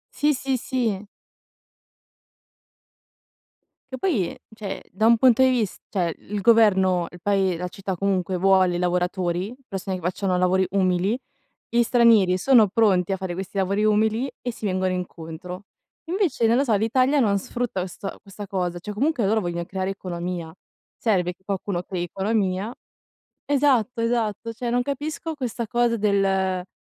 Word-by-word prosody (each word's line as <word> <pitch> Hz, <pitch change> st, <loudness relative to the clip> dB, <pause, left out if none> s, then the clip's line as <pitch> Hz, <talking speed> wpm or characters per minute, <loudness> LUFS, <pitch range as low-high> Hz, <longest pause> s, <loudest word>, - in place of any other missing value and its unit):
Sì, 295 Hz, +1 st, +3 dB
sì, 265 Hz, -1 st, -1 dB
sì. 225 Hz, -6 st, -2 dB, 2.9 s
Che -, -, -9 dB
poi, 245 Hz, -, 0 dB, 0.2 s
cioè 205 Hz, -3 st, -5 dB
da 205 Hz, +5 st, 0 dB
un 230 Hz, 0 st, +6 dB
punto 255 Hz, +1 st, +5 dB
di 260 Hz, -, +5 dB
vis 225 Hz, -6 st, -1 dB
cioè 175 Hz, -5 st, -1 dB
il 205 Hz, 0 st, -5 dB
governo, 190 Hz, -6 st, +4 dB
il 175 Hz, -, -12 dB
pae 195 Hz, -2 st, +1 dB
la 180 Hz, +1 st, -3 dB
città 190 Hz, +1 st, -5 dB
comunque 190 Hz, -1 st, 0 dB
vuole 185 Hz, -1 st, +3 dB
lavoratori, 180 Hz, +3 st, -1 dB
persone 195 Hz, -1 st, -4 dB
che -, -, -10 dB
facciano 180 Hz, +2 st, -1 dB
lavori 185 Hz, +1 st, +2 dB
umili, 185 Hz, +2 st, +1 dB, 0.5 s
gli 235 Hz, +1 st, +2 dB
stranieri 225 Hz, -6 st, +4 dB
sono 220 Hz, 0 st, +5 dB
pronti 195 Hz, -4 st, +2 dB
a 190 Hz, -, 0 dB
fare 190 Hz, -2 st, -4 dB
questi 190 Hz, +2 st, -6 dB
lavori 195 Hz, +2 st, +1 dB
umili, 220 Hz, +4 st, +2 dB
e 245 Hz, -2 st, -3 dB
si 220 Hz, -, -7 dB
vengono 185 Hz, -1 st, 0 dB
incontro. 180 Hz, +1 st, -6 dB, 0.4 s
Invece 335 Hz, -, +1 dB
non 230 Hz, -, +4 dB
lo 270 Hz, -, +3 dB
so, 230 Hz, -5 st, +1 dB
l'Italia 255 Hz, +7 st, +2 dB
non 205 Hz, -5 st, +3 dB
sfrutta 235 Hz, 0 st, -3 dB
questa 190 Hz, +2 st, -6 dB
questa 200 Hz, 0 st, -9 dB
cosa, 180 Hz, -2 st, -2 dB
cioè 210 Hz, +4 st, -6 dB
comunque 255 Hz, 0 st, +1 dB
loro 215 Hz, +2 st, +2 dB
vogliono 170 Hz, -1 st, -3 dB
creare 190 Hz, +1 st, -3 dB
economia, 175 Hz, -3 st, -5 dB, 0.4 s
serve 180 Hz, -6 st, 0 dB
che 190 Hz, -, -37 dB
qualcuno 195 Hz, -2 st, -3 dB
crei 180 Hz, -1 st, -4 dB
economia. 195 Hz, +3 st, -1 dB, 0.7 s
Esatto, 260 Hz, -5 st, +2 dB
esatto, 230 Hz, -1 st, -1 dB
cioè 235 Hz, +1 st, -4 dB
non 245 Hz, +1 st, +2 dB
capisco 305 Hz, +4 st, -4 dB
questa 245 Hz, -5 st, -4 dB
cosa 240 Hz, +1 st, +1 dB
del, 200 Hz, -2 st, +2 dB
vabbè 190 Hz, -1 st, -2 dB
200 Hz, 155 wpm, -24 LUFS, 185-230 Hz, 2.9 s, un